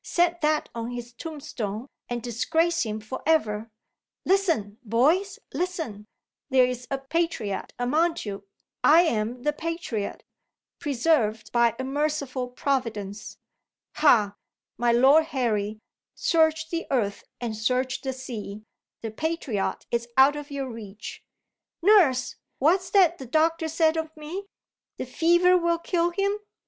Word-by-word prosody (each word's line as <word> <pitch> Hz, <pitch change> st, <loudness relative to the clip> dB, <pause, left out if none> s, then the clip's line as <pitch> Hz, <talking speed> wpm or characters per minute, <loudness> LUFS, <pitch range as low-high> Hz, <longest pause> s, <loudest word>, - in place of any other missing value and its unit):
Set 345 Hz, 0 st, +1 dB
that 305 Hz, 0 st, +1 dB
on 230 Hz, 0 st, -4 dB
his 240 Hz, -1 st, -7 dB
tombstone, 245 Hz, -, -5 dB, 0.2 s
and 240 Hz, -1 st, -3 dB
disgrace 325 Hz, +9 st, +1 dB
him 215 Hz, -2 st, -2 dB
for 215 Hz, +4 st, -7 dB
ever. 225 Hz, -9 st, +1 dB, 0.6 s
Listen, 330 Hz, -, +1 dB
boys 295 Hz, -, +2 dB, 0.2 s
listen! 320 Hz, -, -3 dB, 0.4 s
There 260 Hz, -2 st, +5 dB
is 250 Hz, 0 st, -4 dB
a 275 Hz, -, -1 dB
patriot 270 Hz, -, -2 dB
among 310 Hz, +8 st, +1 dB
you. 200 Hz, -1 st, -6 dB, 0.4 s
I 320 Hz, +3 st, +7 dB
am 240 Hz, -4 st, -1 dB
the 295 Hz, -, +1 dB
patriot 320 Hz, -10 st, -4 dB, 0.6 s
preserved 240 Hz, -8 st, +1 dB
by 235 Hz, -1 st, +3 dB
a 260 Hz, -, -3 dB
merciful 280 Hz, -2 st, -1 dB
Providence. 230 Hz, -6 st, -3 dB, 0.6 s
Ha, 215 Hz, -9 st, +4 dB, 0.4 s
my 240 Hz, 0 st, +2 dB
Lord 270 Hz, +7 st, +6 dB
Harry, 220 Hz, -8 st, -1 dB, 0.4 s
search 315 Hz, -1 st, +2 dB
the 335 Hz, 0 st, -3 dB
earth 215 Hz, -7 st, 0 dB, 0.2 s
and 235 Hz, -3 st, -3 dB
search 255 Hz, +4 st, 0 dB
the 265 Hz, -, -2 dB
sea, 220 Hz, -5 st, -7 dB, 0.4 s
the 225 Hz, -, -3 dB
patriot 280 Hz, -6 st, -2 dB
is 235 Hz, 0 st, -1 dB
out 270 Hz, +2 st, +7 dB
of 295 Hz, 0 st, -7 dB
your 280 Hz, -2 st, -3 dB
reach! 220 Hz, -3 st, -9 dB, 0.6 s
Nurse! 340 Hz, -, +4 dB, 0.2 s
What's 360 Hz, +6 st, +2 dB
that 355 Hz, -4 st, +4 dB
the 265 Hz, -, -8 dB
doctor 320 Hz, +4 st, +2 dB
said 320 Hz, 0 st, +2 dB
of 320 Hz, 0 st, -4 dB
me? 345 Hz, +7 st, -6 dB, 0.5 s
The -, -, -4 dB
fever 345 Hz, +2 st, +4 dB
will 340 Hz, 0 st, +1 dB
kill 340 Hz, 0 st, 0 dB
him? 400 Hz, +3 st, 0 dB
270 Hz, 135 wpm, -26 LUFS, 230-325 Hz, 0.6 s, I